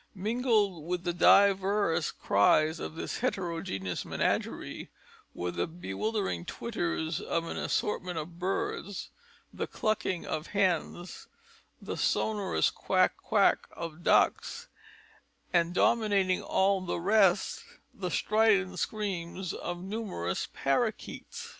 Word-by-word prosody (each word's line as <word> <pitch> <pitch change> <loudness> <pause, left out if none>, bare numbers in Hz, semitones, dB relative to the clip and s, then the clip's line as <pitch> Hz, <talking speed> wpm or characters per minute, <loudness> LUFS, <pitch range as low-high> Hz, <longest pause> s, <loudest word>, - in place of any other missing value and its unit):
Mingled 210 - +1
with 180 0 -2
the 175 0 -1
divers 195 -2 +4
cries 155 +11 +3
of - - -6
this - - -4
heterogeneous 170 - -2
menagerie, - - -2 0.5
were 90 0 -2
the 85 - -2
bewildering 175 - -3
twitterings 170 -5 -3
of 165 0 -1
an - - -5
assortment 180 -4 -1
of 165 +2 -6
birds, 190 +1 -3 0.4
the - - -3
clucking 200 -4 -1
of 155 +1 -3
hens, 180 -2 -1 0.5
the - - -5
sonorous 200 - +1
quack - - +2
quack - - +2
of 165 0 -7
ducks, - - +2 0.8
and 170 0 +2
dominating 200 -5 +3
all 195 0 +2
the 175 -1 -3
rest, 200 - +3 0.3
the 185 -3 -4
strident 210 -1 +2
screams 190 -4 -3
of 175 0 -5
numerous 190 - -3
parrakeets. 235 - -2
185 Hz, 110 wpm, -30 LUFS, 165-205 Hz, 0.8 s, divers